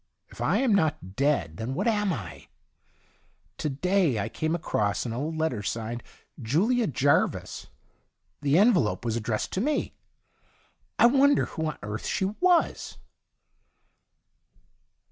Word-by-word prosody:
If - - -11
I - - +2
am 260 -5 +2
not 155 - 0
dead, 130 - 0
then 115 +5 -4
what 235 - -1
am 210 -3 +1
I? 105 - -7 1.1
To 150 - -1
day 175 - +1
I 100 - -2
came 160 +1 -2
across 105 - -1
an 115 - -3
old 150 +6 -3
letter 155 -9 -1
signed 115 +3 -4 0.2
' - - -17
JuHa 200 - +1
Jarvis 140 +3 0 0.4
'; - - -48
the 145 +1 +2
envelope 185 - +3
was 115 -1 -1
addressed 110 -1 -2
to 185 - -1
me. 295 +5 -1 1.0
I - - +6
wonder 280 +3 +4
who 160 -1 -4
on 155 - -4
earth 105 +1 -5
she 190 - 0
was 345 - +1
150 Hz, 140 wpm, -27 LUFS, -, 1.1 s, I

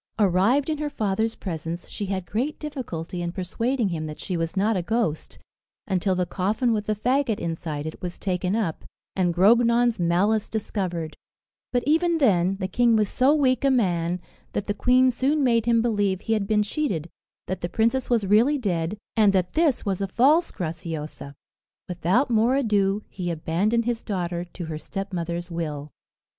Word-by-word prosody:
Arrived 210 +7 +3
in 305 - -2
her 300 -1 -2
father's 220 -3 -1
presence, 165 -1 -5
she 205 - -5
had 190 -2 -3
great 260 +11 -2
difficulty 185 - -5
in 170 0 -2
persuading 225 +6 -1
him 160 -3 -3
that 150 - -8
she 185 - -4
was 165 +2 -2
not 210 +3 +2
a 185 - 0
ghost, 215 -5 -2 0.5
until 190 0 0
the 180 0 0
coffin 215 +7 0
with 210 -1 -2
the 215 - +1
faggot 250 +1 +1
inside 160 -3 -4
it 160 - -7
was 180 -1 -5
taken 185 0 -1
up, 205 -8 -2 0.3
and 180 -2 +2
Grognon's 235 +5 +4
malice 190 +6 +1
discovered 180 -7 -3 0.6
But 245 -1 +1
even 330 +3 +3
then, 195 - +3
the 185 - -1
king 235 +4 +3
was 210 -2 +2
so 265 +4 +3
weak 260 -4 +2
a 275 - +4
man, 180 -8 +1 0.3
that 205 - -2
the 205 - -1
queen 255 +3 +4
soon 275 +4 +1
made 230 -3 +2
him 230 -1 +3
believe 205 -5 0
he 225 - -1
had 210 -3 0
been 210 0 +3
cheated, 205 - -2 0.4
that 185 -1 -4
the 175 - -2
princess 230 +7 +1
was 230 -4 +2
really 225 +9 +4
dead, 185 -5 -2 0.2
and 210 -3 +4
that 180 -2 0
this 310 -7 +2
was 195 -2 -1
a 195 - 0
false 285 - +3
Graciosa. 160 -4 -6 0.5
Without 180 - +1
more 230 +3 +3
ado, 210 -5 +1
he 180 -2 -5
abandoned 180 +8 0
his 235 -1 -1
daughter 175 -4 -3
to 175 0 -8
her 155 -1 -5
stepmother's 175 -2 -4
will. 150 -3 -4
200 Hz, 175 wpm, -24 LUFS, 175-235 Hz, 0.6 s, Grognon's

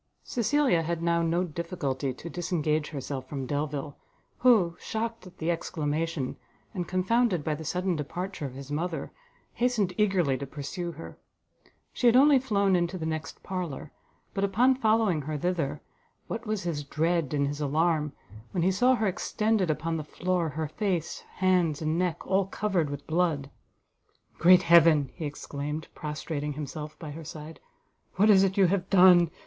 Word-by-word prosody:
Cecilia 250 - +2
had 170 +1 -3
now 170 0 +2
no 170 +2 +1
difficulty 150 -6 -3
to 130 +6 -9
disengage 160 -3 -1
herself 135 -2 -5
from 135 -3 -4
Delvile, 145 +1 -3 0.4
who, 210 -10 +4
shocked 225 -2 -4
at 180 - -15
the 165 +2 0
exclamation, 155 -3 -2 0.4
and 180 -3 -3
confounded 190 -1 +1
by 155 - 0
the 155 +2 -6
sudden 180 +3 -1
departure 165 +2 -4
of 130 - -10
his 140 +1 -9
mother, 165 +2 -3 0.4
hastened 235 -7 +1
eagerly 180 -11 +2
to 140 - -5
pursue 155 +5 -5
her: 165 +2 -10 0.7
she 245 - +2
had 235 - +6
only 275 +1 +7
flown 200 -7 +2
into 175 +1 0
the 160 - -4
next 160 0 -5
parlour; 175 -6 -5 0.4
but, 195 - -1
upon 230 +7 +4
following 220 - +2
her 150 +2 -4
thither, 150 -3 -1 0.4
what 230 0 -5
was 215 -3 -2
his 160 -4 -2
dread 160 +1 0
and 145 -2 +1
his 145 +1 -3
alarm, 150 +1 +1 0.4
when 175 -4 0
he 185 - +3
saw 245 +7 +4
her 220 - -1
extended, 210 0 0
upon 165 +2 -1
the 155 - -4
floor, 175 +2 -1
her 155 +2 -3
face, 175 0 -2 0.2
hands 180 -5 +2
and 155 +1 -1
neck 180 -3 -1
all 190 0 +1
covered 190 -7 -1
with 145 0 -6
blood! 160 -4 0 0.9
"Great 180 +2 +7
Heaven!" 165 -5 +5
he 165 - -6
exclaimed, 145 +1 -5
prostrating 150 -1 -4
himself 150 +1 -6
by 155 -3 -7
her 160 +2 -8
side, 155 +1 -9 0.6
"what 210 +3 +5
is 190 -2 +7
it 195 0 0
you 195 - +6
have 185 +1 0
done! 180 -3 +7
170 Hz, 165 wpm, -28 LUFS, 150-190 Hz, 0.9 s, only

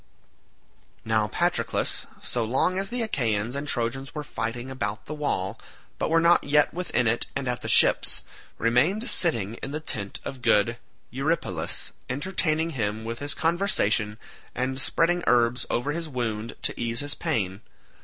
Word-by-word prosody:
Now 110 -1 +2
Patroclus, - - 0 0.2
so 120 - -1
long 135 +11 +1
as 195 0 -2
the 245 -1 0
Achaeans 115 - 0
and 140 +1 -3
Trojans 135 +1 -2
were 150 - -3
fighting 120 0 -4
about 105 -4 -3
the 155 - -6
wall, 115 -9 -2 0.4
but - - 0
were 165 +1 +4
not 170 +1 +5
yet 145 +1 +3
within 175 -8 0
it 115 +1 +1
and 140 -2 -2
at 125 0 0
the - - -4
ships, - - +5 0.3
remained 155 - +2
sitting 115 - +3
in - - -4
the 155 - -2
tent 100 -10 -1
of 130 -2 -6
good 115 +2 +3 0.3
Eurypylus, 135 - -2 0.2
entertaining 160 +3 0
him 110 -5 -2
with 115 +1 -5
his 145 0 -2
conversation 140 - +1 0.4
and 130 +1 -1
spreading 175 +4 +2
herbs 120 0 +3
over 130 +5 0
his 165 +1 -3
wound 115 -4 -3
to - - 0
ease 115 +1 +1
his 145 +1 -2
pain. 105 - -2
125 Hz, 155 wpm, -26 LUFS, 115-155 Hz, 0.4 s, not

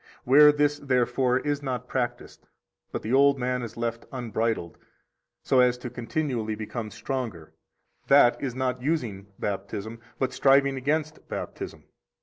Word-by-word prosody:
Where 150 +4 +8
this, 145 0 +1
therefore, 125 -1 +1
is 145 -1 -1
not 125 -3 -4
practised, 125 -2 -4 0.4
but - - -4
the 110 - -2
old 140 +1 +5
man 125 0 -1
is 115 -1 -7
left 115 0 -3
unbridled, 115 -8 -2 0.6
so 130 - +3
as 125 -1 +4
to 125 -1 -7
continually 120 -3 -2
become 110 +1 -5
stronger, 115 - -5 0.5
that 135 -3 +5
is 130 -4 -3
not 130 -1 -1
using 120 -10 -2
Baptism, 105 +2 -4 0.2
but 130 0 -1
striving 140 0 +4
against 150 +3 -2
Baptism. - - -6
125 Hz, 135 wpm, -26 LUFS, 115-140 Hz, 0.6 s, Where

